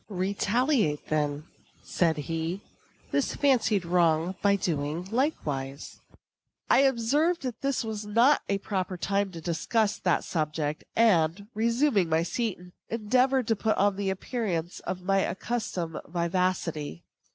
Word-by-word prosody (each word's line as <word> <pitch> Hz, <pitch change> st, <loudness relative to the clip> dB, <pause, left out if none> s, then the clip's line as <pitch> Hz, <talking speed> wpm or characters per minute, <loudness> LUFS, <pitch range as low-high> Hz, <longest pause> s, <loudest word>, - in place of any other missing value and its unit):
"Retaliate, 200 Hz, -, 0 dB
then," 150 Hz, -1 st, 0 dB, 0.4 s
said 165 Hz, -3 st, +1 dB
he, 165 Hz, +5 st, -3 dB, 0.5 s
"this 280 Hz, -, 0 dB
fancied 230 Hz, -9 st, +2 dB
wrong 170 Hz, 0 st, +2 dB
by 200 Hz, -1 st, +4 dB
doing 160 Hz, -2 st, -2 dB
likewise." 145 Hz, -, -2 dB, 0.7 s
I -, -, +6 dB
observed 275 Hz, +6 st, +2 dB
that 250 Hz, -4 st, -5 dB
this 275 Hz, -3 st, 0 dB
was 220 Hz, -2 st, -4 dB
not 230 Hz, +8 st, +4 dB
a 200 Hz, -, +2 dB
proper 190 Hz, -2 st, -3 dB
time 200 Hz, +2 st, 0 dB
to 165 Hz, -, -7 dB
discuss 200 Hz, +6 st, 0 dB
that -, -, +1 dB
subject, 155 Hz, -2 st, -2 dB
and, 195 Hz, -4 st, +3 dB
resuming 230 Hz, -, +2 dB
my 160 Hz, +1 st, +2 dB
seat, 225 Hz, +3 st, -2 dB, 0.3 s
endeavored 250 Hz, +3 st, +2 dB
to 225 Hz, -, +3 dB
put 215 Hz, +1 st, 0 dB
on 200 Hz, 0 st, +3 dB
the 200 Hz, 0 st, -1 dB
appearance 190 Hz, -4 st, -3 dB
of 185 Hz, -1 st, -5 dB
my 195 Hz, +1 st, +2 dB
accustomed 190 Hz, -5 st, -2 dB
vivacity. 170 Hz, -, -1 dB
195 Hz, 130 wpm, -28 LUFS, 165-230 Hz, 0.7 s, I